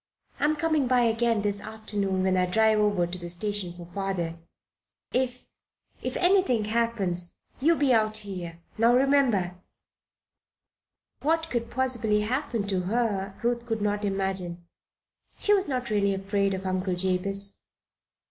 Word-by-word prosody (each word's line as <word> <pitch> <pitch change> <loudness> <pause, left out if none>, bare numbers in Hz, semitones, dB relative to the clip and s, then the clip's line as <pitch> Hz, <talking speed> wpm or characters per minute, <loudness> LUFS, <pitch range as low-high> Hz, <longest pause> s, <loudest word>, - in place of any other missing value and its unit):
"I'm 305 +1 +2
coming 310 -3 +1
by 250 0 +4
again 230 -2 +2
this 205 -1 -1
afternoon 205 -3 -2
when 190 0 +2
I 180 0 +2
drive 220 +3 +3
over 205 -4 +2
to 180 +1 -5
the 175 0 -6
station 195 0 -1
for 175 0 -10
father. 175 -2 -3 0.7
If 250 0 -1 0.5
if - - -3
anything 355 - +3
happens 210 -6 -1 0.2
you 325 +6 +4
be 280 -4 +3
out 215 -1 +3
here 180 -5 -6 0.2
now 235 +2 +5
remember!" 250 -10 +2 1.6
What 325 +2 0
could 235 -1 -2
possibly 240 -5 +1
happen 240 -1 -1
to 190 -2 +1
her, 200 -1 -1
Ruth 235 0 0
could 225 -3 -2
not 205 0 0
imagine. 190 -3 -1 0.7
She 415 - +3
was 395 -1 +2
not 255 -4 -2
really 200 -2 +2
afraid 195 0 0
of 190 0 -7
Uncle 185 0 -1
Jabez. 195 +2 -1
210 Hz, 140 wpm, -27 LUFS, 190-240 Hz, 1.6 s, now